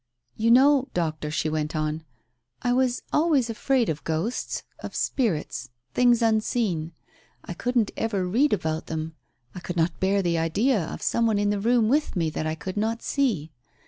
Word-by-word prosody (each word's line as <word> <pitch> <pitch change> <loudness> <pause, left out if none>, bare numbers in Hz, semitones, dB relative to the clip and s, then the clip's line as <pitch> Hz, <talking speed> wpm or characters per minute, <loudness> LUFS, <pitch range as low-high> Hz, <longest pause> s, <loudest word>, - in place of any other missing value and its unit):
"You 225 +1 +1
know, 270 +2 +5
Doctor," 155 -3 -1
she 155 +1 -1
went 155 0 -2
on, 155 +1 -2 0.6
"I 245 - +2
was 255 -1 +1
always 295 -7 +3
afraid 250 +1 +1
of 150 -1 -3
ghosts 165 +10 -2
— - - -43
of - - -7
spirits 210 - -1
— 125 +1 -49
things 240 -1 +4
unseen. 215 -7 0 0.5
I - - -5
couldn't 240 +3 0
ever 200 -5 -1
read 255 +11 +2
about 160 -5 -1
them. 160 0 -4 0.4
I - - -7
could 180 0 -6
not 165 0 0
bear 195 +1 +2
the 170 -2 +1
idea 205 +7 +1
of - - -7
some 230 0 +2
one 215 -2 +2
in 205 0 +1
the 205 - -1
room 230 +1 +3
with 290 +2 +1
me 165 -3 0
that 155 - -3
I 155 - -1
could 185 +4 -6
not 225 +2 -1
see. 215 - 0
205 Hz, 185 wpm, -25 LUFS, 160-240 Hz, 0.6 s, know